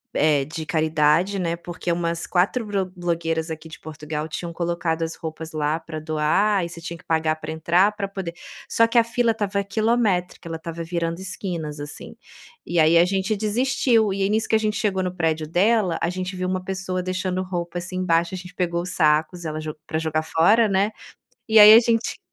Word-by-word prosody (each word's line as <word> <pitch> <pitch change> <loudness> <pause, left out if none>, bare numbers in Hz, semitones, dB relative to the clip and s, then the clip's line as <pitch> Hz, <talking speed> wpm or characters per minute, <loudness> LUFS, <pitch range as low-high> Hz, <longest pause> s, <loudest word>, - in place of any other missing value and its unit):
eh, 150 -2 +3
de 160 +1 -6
caridade, 155 +4 +2
né, 170 -2 -1
porque 175 +1 -5
umas 170 0 -1
4 200 +6 +1
bro 200 -2 -1
blogueiras 165 -2 -2
aqui 160 0 -7
de 155 - -11
Portugal 150 0 -5
tinham 170 +2 -5
colocado 170 -1 -2
as 165 0 -3
roupas 160 0 -7
lá 155 +1 -1
pra 160 -1 -7
doar 160 +6 +1
e - - -6
você 170 0 -9
tinha 170 0 -6
que - - -19
pagar 160 -1 +1
pra 155 0 -7
entrar 170 +5 +3
pra 200 -2 -3
poder 190 -4 -6 0.3
só 230 0 +3
que 235 - 0
a 235 - +7
fila 235 +1 0
estava 205 -2 -1
quilométrica, 200 -4 0
ela 165 - -4
estava 165 +1 -6
virando 170 0 -3
esquinas, 175 -5 -5
assim, 145 0 -7 0.5
e 175 - 0
aí 160 +2 +5
a 170 - +6
gente 195 +3 0
desistiu, 225 0 +2
e 195 0 -1
aí 195 - +1
nisso 220 +1 +1
que - - +3
a - - +6
gente 215 -1 -1
chegou 190 -3 0
no 180 -1 -3
prédio 160 -2 0
dela 190 +2 +2
a 165 - +1
gente 185 +1 -4
viu 185 0 -2
uma 185 0 -2
pessoa 185 -1 -3
deixando 185 0 -2
roupa, 175 -1 -4
assim, 185 +1 -5
embaixo, 170 -1 +1
a - - -3
gente 180 0 -11
pegou 175 -1 -1
sacos, 160 +1 +1
ela 155 0 -3
jo 155 -1 -6
pra 160 - -2
jogar 160 -1 -1
fora, 210 +9 +4
né, 195 +1 +2 0.6
e 220 -1 +7
aí 210 +1 +11
a - - +10
gente 230 -1 0
175 Hz, 205 wpm, -23 LUFS, 160-195 Hz, 0.6 s, aí